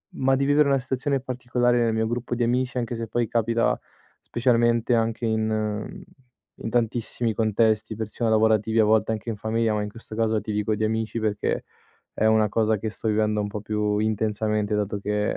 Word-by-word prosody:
ma 135 0 +2
di 135 +1 +1
vivere 145 +1 +4
una 135 -1 +3
situazione 135 +2 -1
particolare 125 -1 0
nel 115 -1 +2
mio 110 0 0
gruppo 120 +1 -3
di 120 - 0
amici, 125 +1 0
anche 120 -1 -2
se 115 0 -4
poi 120 +1 -1
capita 115 +1 +1 0.4
specialmente 120 -1 +2
anche 115 +1 0
in 110 -1 0
mhmm, 110 -1 -3 0.6
in - - -5
tantissimi 115 0 -1
contesti, 110 0 +1
persino 110 +1 -2
lavorativi, 110 0 +2
a - - +6
volte 110 +1 +3
anche 110 +1 -4
in 115 - -2
famiglia, 110 +1 0
ma 105 - 0
in 105 - -3
questo 110 0 -11
caso 110 -1 +1
ti 110 - -5
dico 105 +1 0
di 110 - -2
amici 110 +1 -2
perché 105 -2 -1 0.5
è - - -1
una 110 -1 +4
cosa 110 +1 +1
che 110 - -3
sto 110 - -7
vivendo 105 0 +1
un 105 - -3
po' 105 +1 -5
più 105 0 -1
intensamente 105 0 0
dato 105 0 -1
che, 105 +1 -1
110 Hz, 195 wpm, -24 LUFS, 105-120 Hz, 0.6 s, a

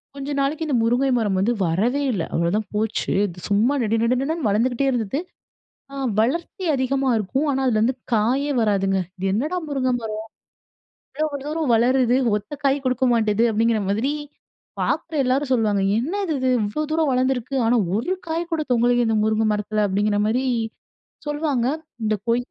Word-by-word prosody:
கொஞ்ச 275 0 -6
நாளைக்கு 295 +4 0
இந்த 285 - 0
முருங்கை 245 +4 +2
மரம் 205 -5 0
வந்து 205 +5 +2
வரவே 220 +12 +1
இல்ல, 185 -6 -1
அவ்வளவுதான் 180 +5 0
போச்சு 220 +1 -1 0.3
சும்மா 210 +6 +2
நடு 225 0 +1
நடுடன்னு 270 +5 0
வளர்ந்துகிட்டே 240 +6 +1
இருந்தது. 245 +1 -1 0.7
ஆ - - -8 0.2
வளர்ச்சி 335 - -1
அதிகமா 270 +1 0
இருக்கும். 255 +8 -1
ஆனா 270 -1 0
அதுல 220 -4 +2
வந்து 250 +4 +2 0.2
காயே 250 +7 +2
வராதுங்க. 195 -3 +1 0.2
இது 190 +1 -3
என்னடா 295 - -1
முருங்கை 260 -3 0
மரம்? 215 -1 -4 1.0
இவ்வளவு 305 -2 -1
தூரம் 305 -2 -1
வளருது 245 +1 +3 0.2
ஒத்த 210 - -7
காய் 275 0 +2
குடுக்கமாட்டுது 235 -4 +2
அப்படிங்குற 225 0 +2
மாரி 225 +8 0 0.7
பாக்குற 325 - -1
எல்லாரும் 265 +2 0
சொல்வாங்க. 215 -5 +2 0.2
என்னது 350 - -2
இது 260 0 +1
இவ்வளவு 220 +9 -2
தூரம் 315 -2 +2
வளர்ந்து 255 +1 +2
இருக்கு, 250 +3 -6
ஆனா 240 +2 +3 0.2
ஒரு 285 - -1 0.2
காய் 335 +2 -2
கூட 325 - 0
தொங்கலயே 240 0 +3
இந்த 225 - +1
முருங்கை 220 0 +1
மரத்துல, 210 0 -1
அப்படிங்குற, 205 +2 +1
மாரி 250 +4 0 0.8
சொல்வாங்க 295 -5 0 0.4
இந்த 215 0 +1
கொய். 240 +1 +2
245 Hz, 155 wpm, -22 LUFS, 215-275 Hz, 1.0 s, வளருது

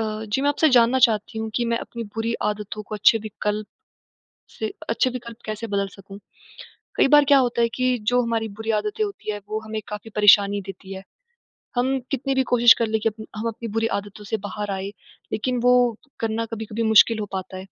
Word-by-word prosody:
अ, 215 0 -3
जी, 265 - +1
मैं 285 - +2
आपसे 290 +2 +3
जानना 240 +2 +5
चाहती 220 -1 0
हूँ 220 0 -3
कि 240 - +1
मैं 230 - +1
अपनी 235 0 -7
बुरी 225 +1 -1 0.2
आदतों 210 0 -5
को 215 - -8
अच्छे 215 +2 +4
विकल्प, 210 0 -3 0.8
से 220 -1 -5 0.2
अच्छे 230 +3 +1
विकल्प 235 -2 -8
कैसे 215 +1 -4
बदल 200 0 0
सकूँ? 195 0 -13 0.8
कई - - +4
बार 295 +1 +7
क्या 280 - +8
होता 245 -3 +1
है 235 - +3
कि 255 -1 +1
जो 245 0 +4
हमारी 230 -2 -1
बुरी 220 0 -1
आदतें 210 - -2
होती 400 - -4
हैं, 205 - -5
वो 215 +1 -3
हमें 215 0 -4
काफ़ी 210 +1 -7
परेशानी 205 -1 +5
देती 195 0 -8
हैं। 190 0 -8 0.7
हम 260 +2 +1
कितनी 275 0 -1
भी 265 - +3
कोशिश 240 -1 +8
कर 230 - +2
लें 220 0 0
कि 225 - +2
अप्न 220 0 -11
हम 215 +2 -3
अपनी 230 +1 -5
बुरी 225 0 +2
आदतों 205 +1 -9
से 220 - -2
बाहर 205 0 -4
आएँ, 195 +1 -4 0.4
लेकिन 250 +3 -1
वो 250 0 +6 0.5
करना 225 0 -1
कभी-कभी 220 0 -4
मुश्किल 220 0 +5
हो 210 - -2
पाता 190 0 -5
है। 185 - -8
220 Hz, 210 wpm, -23 LUFS, 210-240 Hz, 0.8 s, क्या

